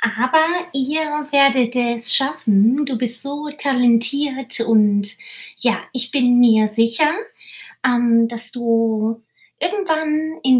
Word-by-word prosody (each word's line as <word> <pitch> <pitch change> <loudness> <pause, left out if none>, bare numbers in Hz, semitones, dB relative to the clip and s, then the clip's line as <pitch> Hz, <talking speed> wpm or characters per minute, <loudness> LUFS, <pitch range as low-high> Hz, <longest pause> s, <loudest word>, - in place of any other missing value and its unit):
Aber 255 +8 +1 0.3
ihr 300 +2 -3
werdet 265 -4 +3
es 240 -1 +2
schaffen. 250 -1 +2
Du 265 - -4
bist 235 -1 +4
so 290 +2 -6
talentiert 260 0 0
und, 210 -3 +1 0.5
ja, - - -1
ich 250 -1 -5
bin 250 -3 +2
mir 220 -3 +4
sicher, 230 +7 +2 0.8
ähm, 240 -2 +2
dass 230 -1 -3
du 230 -2 -2 0.4
irgendwann 315 -4 -2
in 255 -1 +4
245 Hz, 115 wpm, -18 LUFS, 230-280 Hz, 0.8 s, bist